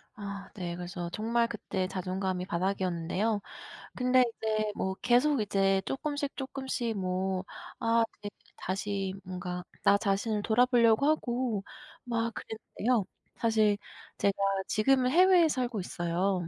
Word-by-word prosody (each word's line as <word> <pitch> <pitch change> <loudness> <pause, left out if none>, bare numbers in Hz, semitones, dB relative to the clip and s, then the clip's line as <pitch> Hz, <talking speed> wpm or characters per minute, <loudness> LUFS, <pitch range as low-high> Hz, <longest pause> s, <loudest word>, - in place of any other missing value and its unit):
아 200 -2 -7
네. 175 -3 -4
그래서 175 0 -5
정말 230 +4 +1
그때 190 -3 -3
자존감이 185 0 -2
바닥이었는데요. 185 +3 -1 0.5
근데 250 0 +4
이제 215 -1 0
뭐 190 - -1
계속 250 +2 +4
이제 195 -2 +2
쪼끔씩, 285 0 -3
쪼끔씩 265 -4 -3
뭐 185 0 -1 0.4
아 230 0 +3
그게 205 0 -8 0.3
다시 195 0 -2
뭔가 180 -1 -5 0.2
나 200 - +6
자신을 205 +1 0
돌아보려고 235 +2 +4
하고 245 -8 0 0.4
막 230 -1 -1
그랬는데요. 220 0 -2 0.3
사실 220 -3 +3 0.4
제가 200 - +2 0.3
지금은 255 +3 +3
해외에 360 +2 +6
살고 250 -6 -1
있어요. 180 0 -1
210 Hz, 275 characters per minute, -30 LUFS, 190-240 Hz, 0.5 s, 나